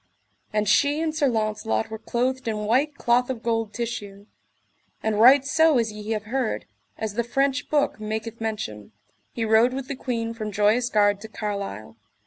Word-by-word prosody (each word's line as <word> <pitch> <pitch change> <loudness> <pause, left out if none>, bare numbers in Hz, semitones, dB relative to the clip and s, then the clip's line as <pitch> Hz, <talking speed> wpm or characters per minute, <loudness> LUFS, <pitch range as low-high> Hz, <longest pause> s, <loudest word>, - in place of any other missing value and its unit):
And 210 -1 0
she 285 +8 +3
and 320 -1 -1
Sir 305 -2 +2
Launcelot 215 - -1
were 220 - -5
clothed 255 +2 -1
in 210 -1 -2
white 270 +7 +2
cloth 245 0 +2
of 240 -3 -4
gold 225 -2 0
tissue; 210 -4 -5 0.8
and 220 -1 0
right 260 +4 +7
so 320 0 +4
as 225 -2 +1
ye 210 0 -8
have 215 -1 -3
heard, 245 +1 -2 0.3
as 220 -2 -3
the 235 +3 0
French 275 +3 0
book 290 -6 +1
maketh 220 +1 -5
mention, 110 - -4 0.4
he 230 - -2
rode 225 +3 +4
with 270 -1 -5
the 280 - -4
queen 230 -3 -3
from 215 -2 -5
Joyous 210 +4 +2
Gard 205 -2 +3
to 220 - -7
Carlisle. 200 - -5
225 Hz, 175 wpm, -24 LUFS, 210-255 Hz, 0.8 s, right